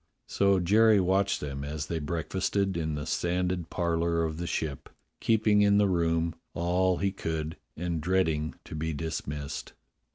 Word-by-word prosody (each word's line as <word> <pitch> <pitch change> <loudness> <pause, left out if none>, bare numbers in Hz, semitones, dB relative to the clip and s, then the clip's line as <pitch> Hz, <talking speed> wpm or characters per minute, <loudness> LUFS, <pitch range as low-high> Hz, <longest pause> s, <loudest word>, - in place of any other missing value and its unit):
So 100 -1 +2
Jerry 105 +4 +5
watched 95 +2 +2
them 70 -1 -4
as 75 +1 -4
they 80 +1 -3
breakfasted 95 +5 -1
in 80 -2 -1
the 75 -1 -4
sanded 90 -1 -1
parlour 85 -1 0
of 80 -1 -2
the 85 0 -4
Ship, 75 -5 -3 0.3
keeping 110 -2 +3
in 100 0 +5
the 105 -1 +4
room 85 -2 +1 0.2
all 90 +2 +2
he 100 0 0
could 80 -4 -3 0.2
and 85 -1 -2
dreading 80 -3 +1
to - - -10
be 80 +1 -2
dismissed. 75 -2 -4
85 Hz, 155 wpm, -29 LUFS, 80-95 Hz, 0.3 s, Jerry